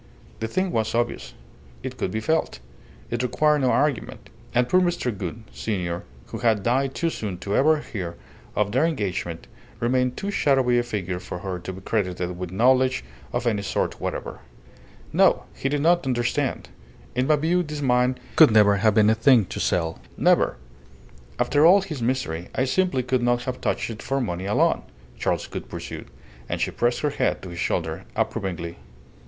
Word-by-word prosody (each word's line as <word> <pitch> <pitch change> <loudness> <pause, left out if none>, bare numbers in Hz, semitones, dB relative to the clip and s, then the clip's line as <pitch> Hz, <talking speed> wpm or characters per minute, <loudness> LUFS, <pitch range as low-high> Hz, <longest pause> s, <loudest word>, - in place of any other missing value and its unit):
The 110 - -2
thing 185 +9 -1
was 110 0 0
obvious. 120 0 -2 0.5
It - - -5
could - - -2
be 110 +4 -3
felt. 160 - 0 0.5
It 120 0 -1
required 150 +4 +2
no 130 -2 +2
argument. 145 -3 -1 0.2
And 125 0 +2
poor 185 +6 +4
Mr. 175 - 0
Gould, 100 +4 -5
senior, 90 -5 -3 0.2
who - - -7
had 110 -4 +2
died 130 +4 +1
too 165 -1 0
soon 100 - -4
to 100 +3 -3
ever 155 +2 +4
hear 90 -10 -5 0.4
of 105 -1 +1
their 130 +6 +2
engagement, 90 - -3 0.3
remained 125 +1 +1
too 200 - -3
shadowy 130 -8 +3
a - - +3
figure 95 -7 -3
for 90 - -6
her 90 0 -4
to 90 - -6
be 95 +1 -9
credited 90 -4 -2
with 90 0 -5
knowledge 130 - +3 0.3
of 120 0 -2
any 110 -4 +1
sort 100 - -2
whatever. - - -4 0.7
"No, - - +4
he 135 - -2
did 145 0 0
not 170 -2 +3
understand. 120 -2 -1 0.4
In 125 +1 0
my 155 - +5
view 165 +5 +1
this 150 -3 -5
mine 125 0 +2 0.2
could 160 - +9
never 105 -2 +5
have 105 +1 +3
been 105 -1 +5
a - - +5
thing 115 -1 +5
to - - -6
sell. 80 -2 0 0.2
Never! - - +3 0.8
After 145 0 +2
all 185 +5 +7
his 160 -9 -6
misery 115 -9 -2
I 130 - +2
simply 135 -2 +1
could 125 0 0
not 120 0 +1
have 130 0 -4
touched - - -1
it 105 - -8
for 135 +1 -1
money 95 -7 -3
alone," 105 - +2 0.4
Charles - - 0
Gould - - -7
pursued: - - -7 0.4
and - - -2
she - - 0
pressed 120 0 0
her 150 - +1
head - - 0
to 95 - -7
his 85 -1 -7
shoulder - - -2
approvingly. 85 -3 -2
120 Hz, 180 wpm, -24 LUFS, 100-135 Hz, 0.8 s, could